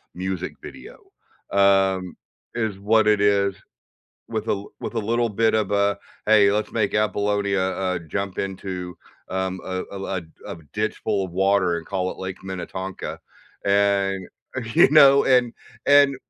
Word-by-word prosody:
music 90 0 -4
video. - - -11 0.5
Um, 95 -2 +3 0.4
is 110 -4 -2
what 110 +2 +3
it 105 -1 +3
is 100 -1 +3 0.8
with - - -4
a 100 0 -1 0.2
with - - -5
a - - 0
little 115 +2 0
bit 110 +1 +1
of 105 -3 +1
a, 100 0 +2 0.3
"Hey. 105 -2 +6
Let's 105 +1 -1
make 105 -3 0
Apollonia, 100 -1 0
uh, 95 -1 -1
jump 100 +1 -3
into, 95 -2 -5 0.3
um, 95 0 -2
a 95 0 -3
a 95 -1 -4
l 90 - -3 0.3
a - - -6 0.2
ditch - - -2
full 95 - 0
of 95 - -7
water 95 -1 +2
and 85 -2 -7
call 95 -2 -2
it - - -9
Lake 95 0 -6
Minnetonka," 95 0 -6 0.4
and, 100 -1 +2 0.5
you - - +6
know, 140 -2 +7
and 125 -3 +3 0.3
and 140 -1 +6
100 Hz, 150 wpm, -23 LUFS, 95-105 Hz, 0.8 s, know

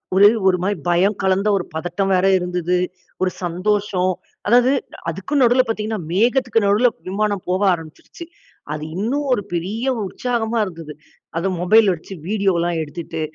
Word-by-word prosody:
ஒரு 200 +1 +8 0.2
ஒரு 185 -1 +4
மாரி 200 +2 0
பயம் 185 +4 +3
கலந்த 190 +2 +1
ஒரு 190 - 0
பதட்டம் 175 +4 -2
வேற 185 0 +3
இருந்தது. 180 -1 -1 0.5
ஒரு 185 -1 +2
சந்தோஷம். 185 +1 0 0.4
அதாவது 245 +4 +5 0.4
அதுக்கும் 195 - -1
நடுவுல 250 +1 +5
பார்த்தீங்கன்னா, 220 0 -2
மேகத்துக்கு 230 +2 +2
நடுவுல 215 +5 +4 0.2
விமானம் 205 0 -1
போக 185 +2 0
ஆரம்பிச்சுருச்சு. 165 - -7 0.5
அது 150 0 -5
இன்னும் 245 +10 -1
ஒரு 205 - 0
பெரிய 210 +10 -2 0.2
உற்சாகமா 235 +2 -2
இருந்தது. 165 -4 -8 0.5
அத 190 +3 -1
மொபைல் 210 +4 +5
வச்சு 170 +3 -9
வீடியோலாம் 180 -5 +1
எடுத்துட்டு, 160 +1 -6
195 Hz, 140 wpm, -20 LUFS, 180-220 Hz, 0.5 s, ஒரு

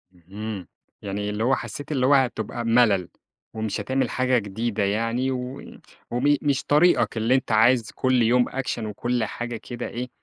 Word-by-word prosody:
اهم، 95 +2 -7 0.3
يعني 105 +1 -3
اللي 105 +1 -2
هو 130 +3 +3
حسيت 145 +1 -7
اللي 130 -4 +1
هو 140 - +5
هتبقى 120 -3 0
مَلل، 115 -6 +3 0.4
ومش 110 -2 -3
هتعمل 130 +5 0
حاجة 130 -1 +1
جديدة 105 0 -2
يعني، 115 +6 0
وي 125 +1 -6 0.3
وم 140 +5 +3
مش 140 -2 0
طريقك 150 -4 +3
اللي 115 +4 +2
أنت 130 -3 -1
عايز 115 +1 +4
كل 130 -1 +1
يوم 120 +2 +3
Action 135 -2 -3
وكل 120 +3 -1
حاجة 120 +2 -4
كده 120 +2 -6
إيه 125 +1 -5
120 Hz, 165 wpm, -24 LUFS, 110-130 Hz, 0.4 s, هو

